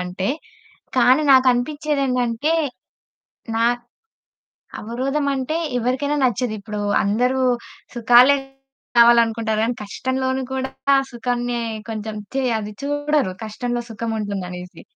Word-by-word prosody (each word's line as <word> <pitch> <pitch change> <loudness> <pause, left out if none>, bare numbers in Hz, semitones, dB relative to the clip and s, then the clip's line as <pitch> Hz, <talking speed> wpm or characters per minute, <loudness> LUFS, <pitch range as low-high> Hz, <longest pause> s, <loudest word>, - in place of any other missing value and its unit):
అంటే. 185 +2 -3 0.7
కానీ 255 +4 +5
నాకనిపిచ్చేది 270 +3 +2
ఏందంటే, 250 +3 0 1.0
నా 230 - +2 1.2
అవరోధమంటే 275 +5 -1 0.2
ఎవరికైనా 260 +5 0
నచ్చదు. 245 -1 0
ఇప్పుడు 210 0 -5 0.2
అందరూ 250 +6 +1 0.5
సుఖాలే 245 +4 +6 0.6
కావాలనుకుంటారు 230 -2 +4
కానీ, 240 - -1
కష్టంలోను 260 +4 -2
కూడా 265 0 -3 0.4
సుఖాన్ని 245 0 -2 0.3
కొంచెం 215 -1 -5 0.2
చే 270 - +1 0.2
అది 210 0 -6
చూడరు 290 -7 0
కష్టంలో 240 +2 -3
సుఖముంటుందనేసి. 200 -5 -5
245 Hz, 90 wpm, -21 LUFS, 220-265 Hz, 1.2 s, సుఖాలే